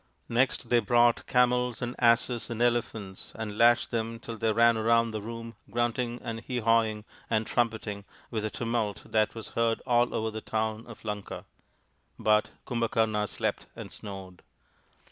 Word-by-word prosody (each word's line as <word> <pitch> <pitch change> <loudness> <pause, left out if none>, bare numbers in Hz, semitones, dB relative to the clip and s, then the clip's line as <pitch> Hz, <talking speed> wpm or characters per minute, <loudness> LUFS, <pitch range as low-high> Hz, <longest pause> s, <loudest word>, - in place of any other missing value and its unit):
Next 125 +3 +1
they 120 - +5
brought 120 +1 +3
camels 125 -1 +2
and 120 0 -3
asses 120 0 +3
and 115 -1 -4
elephants, 115 -5 -1
and 110 -2 -5
lashed 120 +1 +4
them 115 -1 -2
till 115 0 -7
they 110 0 +1
ran 115 +1 +5
round 115 0 +3
the 110 - -3
room 115 +1 -7 0.2
grunting 120 0 -1
and 115 -1 -4
hee 125 +2 -4
hawing 110 -2 +2 0.2
and 110 -1 +1
trumpeting 110 -4 -1 0.3
with 110 -3 -2
a 110 - -1
tumult 115 -2 -2
that 110 0 +1
was 115 - -7
heard 115 -1 +1
all 120 -1 +2
over 110 0 -1
the 110 0 -5
town 110 +1 -2
of 115 -1 -12
Lanka. 105 -1 -5 0.7
But 105 0 +3 0.2
Kumbhakarna 110 -3 0
slept - - -2
and - - -8
snored. 95 -3 -9
115 Hz, 160 wpm, -28 LUFS, 110-120 Hz, 0.7 s, they